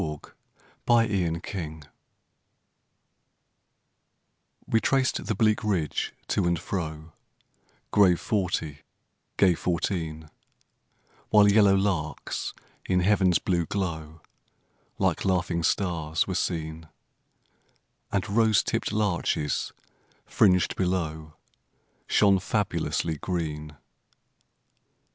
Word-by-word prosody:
22 75 -4 -6 0.6
The 115 -1 +5
Train 90 -6 0
of 85 - -8 0.4
Life - - -21 2.8
We 115 - +1
traced 135 -1 +1
the 110 - 0
bleak 110 +1 +2
ridge, 90 -8 -1 0.2
to - - +1
and 85 0 +1
fro, 80 -4 -5 0.8
Grave 95 -4 +5
forty, 85 -8 -2 0.6
gay 95 -3 +5
fourteen; 80 -3 -3 1.0
While 105 -1 +6
yellow 100 -2 +5
larks, 95 -6 -2 0.3
in 90 -1 +2
heaven's 95 -2 +3
blue 85 -3 -1
glow, 80 -5 -4 0.8
Like - - 0
laughing 90 -2 0
stars 80 -4 0
were - - -3
seen, 80 -1 -3 1.2
And 100 -2 -1
rose 110 0 +3
tipp'd - - -2
larches, 85 -7 -1 0.5
fringed 90 -3 +3
below, 80 -4 -2 0.7
Shone 100 -2 +4
fabulously 90 -6 -1
green. 75 -4 -4
90 Hz, 90 wpm, -26 LUFS, 80-100 Hz, 2.8 s, While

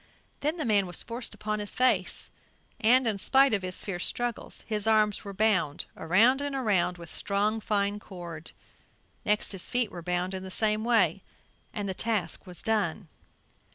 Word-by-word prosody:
Then 305 +4 -1
the 310 - -2
man 205 -4 +3
was 175 - -3
forced 235 +1 -4
upon 215 0 -3
his 205 -1 -5
face 255 0 +1 0.5
and, 250 +4 +5
in 215 -3 0
spite 270 +3 +4
of 200 - +2
his 185 0 -3
fierce 180 -3 -4
struggles, 240 -1 -3
his 215 -1 -2
arms 215 -2 +3
were 200 - -6
bound 190 -7 +1
around 225 - +3
and 285 -1 -3
around 195 -8 +1
with 170 -1 -10
strong 210 +2 0
fine 205 -1 0
cord; 170 -5 -9 0.8
next 210 0 +2
his 195 -3 -6
feet 245 -4 0
were 175 - -7
bound 180 +2 -1
in 190 - -4
the 190 - -7
same 215 +2 +2
way, 235 -1 +3 0.5
and 205 -2 -4
the 190 - -2
task 215 -2 -2
was 180 -1 -4
done. 205 -5 -1
210 Hz, 175 wpm, -28 LUFS, 185-225 Hz, 0.8 s, and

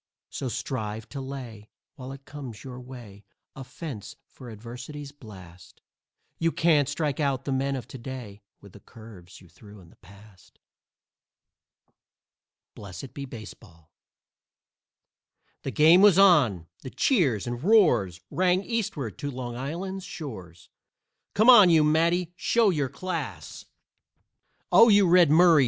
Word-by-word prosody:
So 130 - -4
strive 110 -2 -5
to 140 - -7
lay, 125 -6 -9 0.2
while 130 -3 -9
it 135 0 -12
comes 135 -7 -9
your 125 -2 -9
way, 120 -6 -12 0.3
A 135 - -8
fence 140 - -9
for 125 -3 -13
Adversity's 125 +6 -9
blast. 95 -10 -15 0.6
You 165 0 +1
can't 150 -5 +2
strike 150 -1 -2
out 135 -3 -1
the 140 - -3
men 135 +1 -1
of 125 -3 -7
to 135 - -9
day 115 -5 -9 0.2
With 100 - -15
the - - -14
curves 110 -8 -15
you 90 - -17
threw 100 +4 -16
in 85 -3 -18
the - - -22
past. 100 -1 -19 2.2
BLESSED 100 +5 -10
BE 140 - -7
BASEBALL 105 - -13 1.7
The - - -5
game 160 +6 +5
was 200 -3 +6
on! 145 - +4 0.2
The 130 - -8
cheers 140 - +1
and 120 +1 -5
roars 125 - +3
Rang 185 +1 +1
Eastward 170 - -4
to 145 -1 -4
Long 125 -3 -6
Island's 180 +9 -5
shores; 95 - -9 0.7
"Come 215 +3 +3
on, 225 -8 +9
you 160 -2 +5
Matty 170 +3 +1
show 215 +5 +2
your 145 -6 -1
class!" 140 - -6 1.1
"Oh, 230 +1 +7
you 200 -2 +5
Red 175 -2 +5
Murray! 165 0 +6
135 Hz, 140 wpm, -26 LUFS, 110-165 Hz, 2.2 s, on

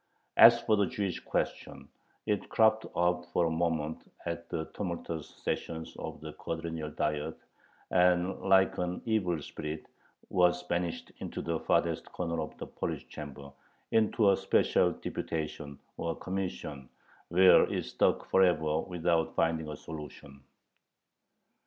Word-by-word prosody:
As 120 0 +9
for 110 -2 +2
the 100 - +3
Jewish 100 -7 -2
question, - - -3 0.4
it 105 -2 -1
cropped 110 0 +3
up 90 0 +2
for 85 - +2
a 80 - 0
moment 80 -2 -2
at 85 0 -4
the 80 - -2
tumultuous 85 -4 -4
sessions 80 -1 -4
of - - -6
the - - -7
Quadrennial 80 -1 -4
Diet, 75 -1 -2 0.5
and 90 +1 +3
like 95 0 +4
an 90 0 -2
evil 95 -8 +1
spirit 75 +2 -6 0.4
was 90 -1 +3
banished 85 -1 -2
into - - -5
the 80 -1 -1
farthest - - 0
corner 85 -1 -2
of - - -6
the - - -6
Polish - - -4
Chamber, 70 -1 -8 0.4
into 110 -2 +4
a - - +4
special - - +3
"deputation," 75 -3 -4 0.2
or 85 -1 -2
commission, 90 -7 -5 0.4
where 90 +2 +6
it - - -1
stuck - - +1
forever, 80 -5 +3
without 85 -2 0
finding 80 -1 +1
a 75 - -6
solution. 75 -3 -9
85 Hz, 135 wpm, -31 LUFS, 80-90 Hz, 0.5 s, As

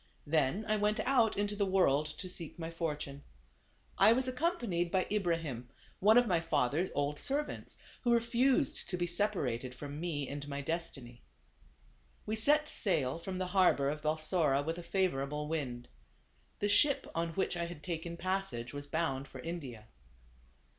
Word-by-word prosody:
Then 155 +7 +1
I 215 0 +2
went 210 +1 +1
out 240 -6 +3
into 205 0 0
the 205 - +1
world 155 -6 +3
to 185 +5 -6
seek 175 -3 -4
my 165 -1 -5
fortune. 150 -4 -4 0.8
I 225 - +8
was 260 +2 +1
accompanied 250 - 0
by 185 +1 +1
Ibra 185 -5 +2
him, 125 -7 -6 0.3
one 215 +4 +6
of 245 - +6
my 180 -6 +2
father's 165 +2 +1
old 145 +1 -1
servants, 290 +2 -3 0.2
who 240 - +2
refused 235 -1 +2
to 180 - -2
be 175 - 0
separated 145 - 0
from 145 +2 -7
me 155 -5 -2
and 145 0 -6
my 140 -1 -4
destiny. 140 -6 -5 1.0
We 215 - -1
set 295 +7 +4
sail 160 - 0
from 185 +2 -5
the 185 - -1
harbor 160 -7 +4
of 150 0 -5
Balsora 155 -2 +1
with 165 +3 -3
a - - -5
favorable 150 -6 -1
wind. 130 -6 -3 0.7
The 205 - 0
ship, 265 +8 +4
on 165 0 -2
which 190 - 0
I 170 0 -1
had 170 -3 -9
taken 170 +1 -4
passage, 175 -10 -2
was 145 0 -6
bound 140 -4 -1
for 135 - -10
India. 135 -9 -6
170 Hz, 165 wpm, -33 LUFS, 145-200 Hz, 1.0 s, I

